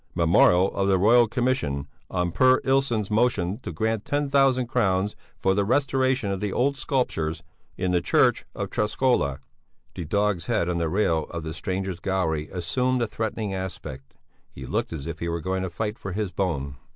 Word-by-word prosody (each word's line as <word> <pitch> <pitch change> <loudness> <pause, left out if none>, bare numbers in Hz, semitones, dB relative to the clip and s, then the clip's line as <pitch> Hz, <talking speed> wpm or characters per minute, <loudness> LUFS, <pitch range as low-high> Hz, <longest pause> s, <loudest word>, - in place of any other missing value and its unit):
Memorial 90 +2 +4
of 100 0 +1
the 95 -1 +4
Royal 115 +5 +5
Commission 110 - -1 0.2
on 90 -1 -1
Per 130 +6 +4
Ilsson's 130 -6 +1
motion 105 -4 +1
to 130 - -6
grant 110 +5 -1
ten 145 0 -1
thousand 135 -2 +3
crowns 105 -4 0 0.2
for 95 - +2
the 100 +1 +1
restoration 130 -2 +1
of 95 - -2
the 105 0 -2
old 140 +6 +1
sculptures 125 - -1 0.3
in 90 - -1
the 90 -1 +2
church - - +3
of - - -4
Träskola." 105 - +1 0.6
The 85 - -6
dog's 100 -1 0
head 85 - +1
on 85 -1 -1
the 85 -1 0
rail 85 -4 +1
of 85 -1 -6
the 80 0 -5
strangers' 95 +1 -3
gallery 80 -6 -1
assumed 125 +8 0
a - - -1
threatening 110 -2 -3
aspect; 85 -8 -7 0.3
he 65 - -10
looked - - -2
as 80 -4 -6
if 80 -1 -5
he 85 - -2
were 85 0 -2
going 95 +3 -2
to 95 - -2
fight 105 +4 -4
for 95 - -5
his 105 -1 -2
bone. 70 -8 -2
95 Hz, 185 wpm, -25 LUFS, 85-120 Hz, 0.6 s, Royal